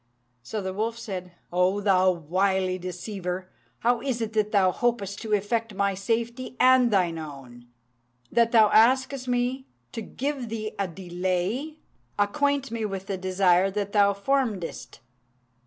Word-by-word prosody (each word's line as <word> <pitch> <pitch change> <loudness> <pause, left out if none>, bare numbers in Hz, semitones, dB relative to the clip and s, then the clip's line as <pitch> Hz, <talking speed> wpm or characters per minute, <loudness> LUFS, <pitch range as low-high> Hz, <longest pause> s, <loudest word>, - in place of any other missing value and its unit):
So 200 - -5
the 190 0 -3
wolf 225 +3 -2
said, 185 -5 -6 0.2
"O 180 +3 +2
thou 190 -2 +4
wily 185 +2 0
deceiver! 180 0 -5 0.3
how 240 0 +2
is 260 -4 -2
it 225 -1 -3
that 215 -1 +1
thou 190 -3 +4
hopest 205 -3 -1
to 220 -1 -3
effect 215 +1 0
my 200 0 +1
safety 235 +6 -2
and 255 -1 +6
thine 180 -6 +1
own, 135 -6 -10 0.6
that 235 -1 +3
thou 220 -3 +6
askest 260 +3 +3
me 250 +2 -1 0.2
to 225 - -5
give 265 +2 -4
thee 215 -1 -4
a 195 - 0
delay? 185 - -3 0.4
Acquaint 275 +6 +1
me 230 -1 -3
with 195 -2 -4
the 195 - -3
desire 185 0 +3
that 200 0 -3
thou 200 -1 +4
formedst." 205 -3 -2
205 Hz, 145 wpm, -26 LUFS, 185-235 Hz, 0.6 s, and